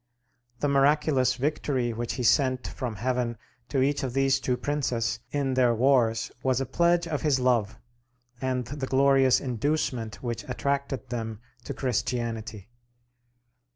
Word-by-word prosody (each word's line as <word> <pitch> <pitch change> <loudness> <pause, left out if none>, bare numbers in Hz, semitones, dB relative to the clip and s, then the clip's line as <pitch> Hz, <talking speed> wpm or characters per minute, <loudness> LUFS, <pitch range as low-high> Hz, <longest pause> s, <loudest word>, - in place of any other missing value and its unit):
The 145 - +2
miraculous 140 -2 +3
victory 130 -3 -1
which 120 +1 -3
he 125 - -3
sent 130 +1 +2
from 120 -4 -5
heaven 120 +1 -1 0.3
to 135 -2 +1
each 145 +1 +1
of 130 -3 -3
these 135 0 +2
two 125 -2 -1
princes 125 -6 -1
in 140 -2 -1
their 125 -2 +3
wars 120 -2 +2
was 130 -1 +1
a 135 - -1
pledge 170 +6 +2
of 150 -3 -2
his 145 -4 +2
love, 120 -4 +1 0.6
and 130 -1 -1
the 135 +2 -5
glorious 135 -1 +4
inducement 125 -2 -2
which 120 -2 -3
attracted 140 0 -2
them 115 -3 -4 0.3
to 140 - -5
Christianity. 115 -4 -2
130 Hz, 140 wpm, -27 LUFS, 120-140 Hz, 0.6 s, glorious